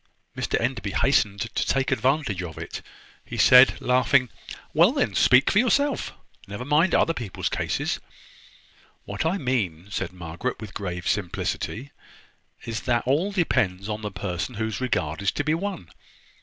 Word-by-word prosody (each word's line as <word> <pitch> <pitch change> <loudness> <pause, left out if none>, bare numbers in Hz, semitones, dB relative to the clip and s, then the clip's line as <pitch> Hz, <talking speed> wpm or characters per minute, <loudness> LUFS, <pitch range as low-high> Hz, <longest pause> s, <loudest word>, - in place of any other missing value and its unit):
Mr - - -1
Enderby - - -2
hastened 100 -1 +2
to 115 0 -2
take 135 0 0
advantage 130 - 0
of 85 -3 -7
it. - - -6 0.4
He - - -8
said, 125 +1 +7
laughing: 125 0 +3 0.4
"Well, - - +5
then, - - 0
speak 125 +3 +5
for 205 - +4
yourself. 275 +4 +1 0.3
Never 100 +5 -6
mind 150 +5 +3
other 165 - +3
people's 115 - -4
case." - - -2 1.1
"What 100 +10 -2
I 180 +4 0
mean," 100 - -2
said 95 -3 -3
Margaret, 90 +7 -5
with 110 -3 -9
grave 90 -3 -5
simplicity, 105 +6 -2 0.7
"is, 115 -1 -3
that 120 -1 +2
all 155 +10 +1
depends 100 - 0
upon 105 0 -3
the 105 - -3
person 95 +3 -4
whose 110 +1 -3
regard 80 -9 -1
is 100 - +1
to - - -2
be 155 +2 +1
won. 170 - -4
115 Hz, 155 wpm, -25 LUFS, 95-140 Hz, 1.1 s, said